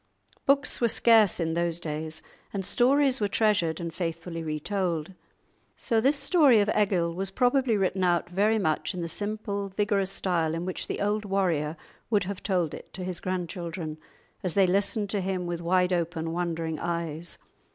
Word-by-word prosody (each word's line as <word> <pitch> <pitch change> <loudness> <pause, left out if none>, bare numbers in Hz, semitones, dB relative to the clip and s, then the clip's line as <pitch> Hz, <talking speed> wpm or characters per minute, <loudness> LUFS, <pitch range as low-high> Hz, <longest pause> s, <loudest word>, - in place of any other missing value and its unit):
Books 280 0 +3
were 235 - +4
scarce 225 -4 +5
in 165 -1 0
those 170 0 0
days, 155 0 -5 0.3
and 195 -2 -3
stories 265 +4 +3
were 205 - +2
treasured 200 -6 +1
and 170 -1 -5
faithfully 165 0 -4
re 155 -1 -3
told. 180 -2 -2 0.6
So 230 -3 +1
this 275 +5 +3
story 280 -4 +5
of 205 0 +2
Egil 185 -5 +2
was 190 +2 -2
probably 245 +1 +2
written 190 -1 0
out 175 -1 +2
very 205 +5 +2
much 160 0 0
in 180 - -4
the 170 - -2
simple, 205 +1 -3
vigorous 200 -1 0
style 170 -5 0
in 170 +1 -3
which 185 - -3
the - - -3
old 205 +1 0
warrior 175 -6 0 0.3
would 210 -4 +2
have 190 0 -5
told 180 -5 0
it - - -10
to 185 - -5
his 180 -1 -4
grandchildren, 170 -3 -4 0.4
as 180 -3 -2
they 195 -1 +5
listened 200 +2 0
to 205 - 0
him 185 -1 -2
with 175 -1 -3
wide 180 +1 +2
open, 165 -1 -1
wondering 165 -2 -2
eyes. 170 -1 -3
185 Hz, 175 wpm, -27 LUFS, 170-205 Hz, 0.6 s, scarce